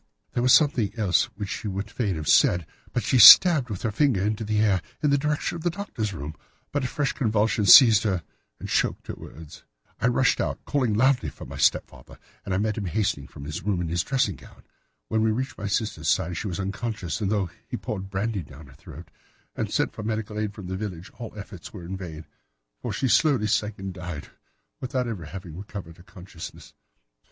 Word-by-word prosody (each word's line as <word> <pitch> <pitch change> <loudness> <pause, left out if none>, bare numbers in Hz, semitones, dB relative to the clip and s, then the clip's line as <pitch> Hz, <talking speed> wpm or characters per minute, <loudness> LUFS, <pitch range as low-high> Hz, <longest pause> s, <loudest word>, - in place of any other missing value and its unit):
There 120 - 0
was 125 +1 +3
something 130 -10 +4
else 90 -7 +2
which 100 -3 -5
she 105 - -4
would 100 +2 -4
fain 105 -7 -1
have 75 -1 -5
said, 90 -2 +4 0.3
and 120 - 0
she 130 - +2
stabbed 140 - +10
with 100 -4 -5
her 115 - 0
finger 115 -4 +2
into 105 +2 -1
the 105 0 0
air 100 -4 +2 0.2
in 150 - +3
the 140 - +4
direction 150 +3 -1
of - - -8
the 175 - +1
Doctor's 165 - -4
room, 75 -4 -6 0.4
but 145 -2 -1
a - - 0
fresh 145 +2 -1
convulsion 110 -4 +1
seized 110 0 +9
her 95 -6 -1 0.4
and - - -7
choked - - 0
her - - -5
words. 80 -2 -12 0.4
I 115 - +2
rushed 125 +1 +2
out, - - -4
calling 125 -7 0
loudly 130 +3 +2
for - - -11
my 70 +1 -9
stepfather, 70 - 0 0.3
and - - -6
I 95 - +1
met 105 +1 -1
him 100 - -4
hastening 100 -7 -1
from 70 - -11
his 75 +2 -5
room 100 -3 -1
in 85 -2 -2
his 85 +1 0
dressing 125 -7 0
gown. - - -17 0.4
When 110 - 0
he - - +3
reached 130 +5 -3
my 100 - -3
sister's 100 -6 -2
side 90 +1 +1
she 105 - -4
was 90 -1 -4
unconscious, 100 0 -4
and 100 -1 0
though 100 -5 -1 0.2
he - - -4
poured 95 -2 -5
brandy 100 +1 -2
down 75 0 -13
her 65 - -16
throat - - -13 0.4
and - - -3
sent - - 0
for - - -7
medical 110 -1 -3
aid 105 -1 -3
from 100 - -9
the 95 +1 -4
village, 95 -4 -6
all 115 -2 -6
efforts 100 -4 -9
were 90 -5 -9
in 95 +3 -5
vain, 80 -5 -8 0.6
for - - -3
she 135 - -1
slowly 135 -4 +3
sank 105 0 0
and 95 -1 -6
died 90 -5 -7 0.5
without 130 -1 -2
having 90 -5 -7
recovered 95 -3 -8
her 85 - -16
consciousness. 90 -3 -11
105 Hz, 215 wpm, -25 LUFS, 90-115 Hz, 0.6 s, stabbed